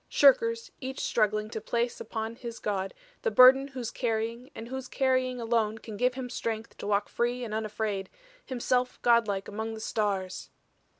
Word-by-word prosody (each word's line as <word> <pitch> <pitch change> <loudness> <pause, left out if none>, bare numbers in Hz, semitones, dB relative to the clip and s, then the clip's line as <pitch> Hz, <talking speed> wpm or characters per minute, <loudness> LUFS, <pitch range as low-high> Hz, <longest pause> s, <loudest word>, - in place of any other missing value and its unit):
Shirkers 230 -5 +4
each 265 +1 -5
struggling 215 -1 +1
to 220 - -4
place 235 +2 -1
upon 220 0 -4
his 235 -2 -7
god 195 -2 -2 0.3
the 480 - +1
burden 265 - +8
whose 255 -4 -5
carrying 230 +1 -2
and 225 - -7
whose 265 +1 -5
carrying 255 -1 +1
alone 225 -2 +1
can 220 -1 -8
give 250 +4 +1
him 260 -1 -4
strength 225 -2 -4
to - - -5
walk 205 0 +1
free 240 +1 -1
and 220 -3 -5
unafraid, 215 -2 -2 0.3
himself 250 0 0
godlike 220 -5 +3
among 220 +2 -4
the - - -7
stars." 200 -4 -2
230 Hz, 165 wpm, -29 LUFS, 215-250 Hz, 0.3 s, burden